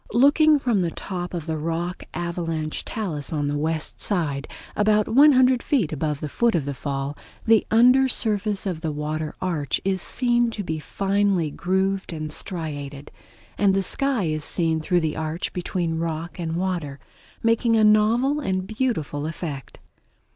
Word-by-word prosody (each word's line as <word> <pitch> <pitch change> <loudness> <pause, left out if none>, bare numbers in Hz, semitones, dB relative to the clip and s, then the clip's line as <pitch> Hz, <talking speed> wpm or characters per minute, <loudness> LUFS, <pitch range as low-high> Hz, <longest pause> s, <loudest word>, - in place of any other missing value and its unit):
Looking 295 +5 +5
from 245 -7 +1
the 175 -2 +1
top 180 +1 -5
of 170 -4 -4
the 160 -1 -2
rock 165 +3 -3
avalanche 165 -3 -3
talus 175 - -4
on 150 -2 -1
the 145 0 -1
west 155 +1 -2
side, 150 -8 0 0.3
about 210 0 +3
one 285 +5 +6
hundred 255 -1 +4
feet 220 - 0
above 150 -1 -2
the 150 - -2
foot 235 +8 +1
of 155 -5 0
the 140 - -3
fall, 140 +1 -4 0.3
the 225 -1 +4
under 250 +4 +5
surface 210 -5 0
of 175 -5 -3
the 160 -2 -2
water 150 +1 -3
arch 160 -7 -1
is 190 -2 +1
seen 240 -1 +2
to 220 -3 -5
be 160 -3 -3
finely 195 0 0
grooved 190 +2 -1
and 155 -1 -5
striated; 145 -6 -5 0.5
and 195 -2 +4
the 195 - +1
sky 275 +1 0
is 155 -2 -1
seen 165 -1 +1
through 175 +2 +1
the 155 -1 -1
arch 160 +1 -3
between 175 -2 -2
rock 165 +1 -4
and 165 -1 -2
water, 170 -7 -2 0.4
making 230 0 +3
a 220 - +4
novel 225 +7 +4
and 185 -8 -1
beautiful 190 - -2
effect. 155 -5 -6
175 Hz, 165 wpm, -24 LUFS, 155-215 Hz, 0.5 s, one